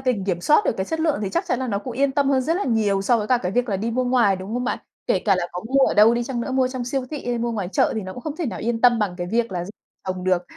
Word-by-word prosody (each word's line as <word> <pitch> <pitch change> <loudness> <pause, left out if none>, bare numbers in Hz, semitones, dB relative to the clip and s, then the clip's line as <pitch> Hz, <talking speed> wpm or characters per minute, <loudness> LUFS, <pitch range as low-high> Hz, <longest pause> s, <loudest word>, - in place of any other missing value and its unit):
đình 250 -7 0
kiểm 180 -3 -1
soát 300 - +4
được - - +2
cái 190 - -1
chất 320 +9 -3
lượng 315 -2 +1
thì 200 - -1
chắc - - -1
chắn 245 - 0
là 260 -1 -3
nó 200 -3 0
cũng 250 +4 -6
yên 270 +3 +1
tâm 275 0 +1
hơn 265 -1 +3
rất 320 +6 0
là 405 - -1
nhiều 215 -5 +1
so 235 +4 +3
với 210 - -2
cả 250 +2 +3
cái 180 -4 -3
việc 245 +3 0
là 200 - 0
đi 220 +5 -2
mua 255 +2 0
ngoài, 245 -6 +3
đúng 190 +4 -6
không 250 0 -1
bạn? 250 - -1 0.3
Kể - - +2
cả 200 -3 +4
là 175 -1 -1
có 180 - -4
mua 270 +1 +4
ở - - 0
đâu 215 +3 +6
đi 240 0 -1
chăng 245 -1 -3
nữa, 260 - -3
mua 260 -1 +2
trong 255 -1 -4
siêu 260 +1 -2
thị 295 -5 -6
hay 240 -1 -1
mua 235 0 -1
ngoài 200 -5 -3
chợ - - +2
thì 220 - -1
nó 185 0 -7
cũng 250 - -9
không 305 +2 -5
thể 340 - -2
nào 235 - -4
yên 230 0 -2
tâm 245 -1 +5
bằng 205 -5 -1
cái 175 -1 -4
việc 230 -1 0
là 175 -1 -2
gi 190 - -8 0.4
trồng 185 -1 -3
được. 185 -1 +2
235 Hz, 365 wpm, -22 LUFS, 195-255 Hz, 0.4 s, đâu